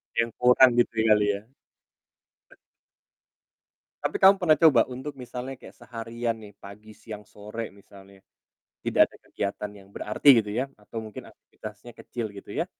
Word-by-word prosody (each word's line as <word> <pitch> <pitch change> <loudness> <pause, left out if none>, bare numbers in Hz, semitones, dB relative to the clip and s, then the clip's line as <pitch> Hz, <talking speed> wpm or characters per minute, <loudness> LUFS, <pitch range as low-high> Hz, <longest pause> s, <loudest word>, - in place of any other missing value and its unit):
Yang 115 0 +2
kurang 125 +1 +7
gitu 120 - +2
kali 105 -1 +5
ya? 105 +3 -10 2.6
Tapi - - -2
kamu 195 +1 +8
pernah 165 -5 +4
coba 160 -1 +6
untuk 130 +3 -7
misalnya 125 +1 -7
kayak - - -14
seharian 115 0 -4
nih 105 -2 -13
pagi, 105 +2 -12
siang, 105 -2 -10
sore, 105 +3 -8
misalnya 100 -1 -17 0.6
tidak - - +4
ada - - -18
kegiatan 100 +1 -3
yang 95 - -16
berarti 105 +7 -3
gitu 105 - -8
ya, 125 +4 0
atau 110 +2 -7
mungkin 110 -2 -9
aktivitasnya 110 +2 -12
kecil 115 -3 -5
gitu 100 - -10
ya. - - -1
115 Hz, 145 wpm, -26 LUFS, 105-125 Hz, 2.6 s, kamu